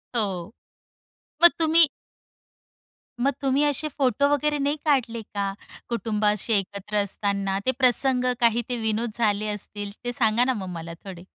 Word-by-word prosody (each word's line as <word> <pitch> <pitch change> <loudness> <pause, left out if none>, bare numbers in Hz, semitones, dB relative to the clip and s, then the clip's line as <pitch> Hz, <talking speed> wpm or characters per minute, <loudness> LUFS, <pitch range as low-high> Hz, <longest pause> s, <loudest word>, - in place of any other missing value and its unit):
हो, 195 -4 -2 0.9
मग 345 - +10
तुम्ही 325 0 +5 1.3
मग 275 +3 +3
तुम्ही 275 +1 +2
असे 295 +1 0
फोटो 270 0 +2
वगैरे 295 +1 +1
नाही 285 +1 0
काढले 245 -6 +1
का? 200 -1 -4 0.4
कुटुंब 220 -2 -2
असे 210 +2 +1
एकत्र 200 +2 -4
असताना 200 -1 -1
ते 260 - +3
प्रसंग, 255 0 +3
काही 235 0 +3
ते 245 - -1
विनोद 220 +1 -1
झाले 215 -2 +1
असतील. 205 0 -4
ते 245 - -2
सांगा 225 0 +3
ना 260 +1 +1
मग 185 - -6
मला 165 +1 -8
थोडे. 185 -3 -9
230 Hz, 150 wpm, -24 LUFS, 205-270 Hz, 1.3 s, मग